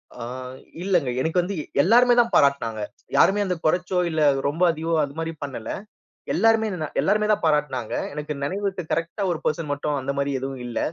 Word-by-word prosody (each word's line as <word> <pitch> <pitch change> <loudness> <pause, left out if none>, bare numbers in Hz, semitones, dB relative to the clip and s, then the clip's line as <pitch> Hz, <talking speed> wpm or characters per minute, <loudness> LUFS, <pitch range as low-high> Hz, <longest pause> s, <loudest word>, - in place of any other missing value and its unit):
ஆ, 125 - -7 0.6
இல்லங்க. 175 -8 +1
எனக்கு 165 +5 +1
வந்து 190 +3 -4 0.3
எல்லாருமே 245 +6 +5
தான் 235 -1 +3
பாராட்டுனாங்க. 115 -6 +2 0.4
யாருமே 205 +1 +4
வந்து 180 -2 -1
குறச்சோ! 180 +3 +1
இல்ல 160 -1 -1 0.3
ரொம்ப 155 +5 0
அதிகமோ! 165 +1 -3
அதுமாரி 160 +4 -5
பண்ணல. 125 -6 -5 0.6
எல்லாருமே 225 +3 +3
இதனரு 160 -6 -5
எல்லாருமே 210 0 +2
தான் 210 - +1
பாராட்னாங்க. 150 -7 0 0.2
எனக்கு 150 +1 -4
நெனைவு 195 +8 -2
இருக்கு, 190 -2 -3
கரெக்ட்டா 165 +5 -1
ஒரு 165 - -2
பர்சன் 155 -1 -1
மட்டும் 145 0 -2
அந்தமாரி 140 +1 -1
எதுவும் 135 -1 -5
இல்ல 120 - -3
160 Hz, 165 wpm, -24 LUFS, 140-190 Hz, 0.6 s, எல்லாருமே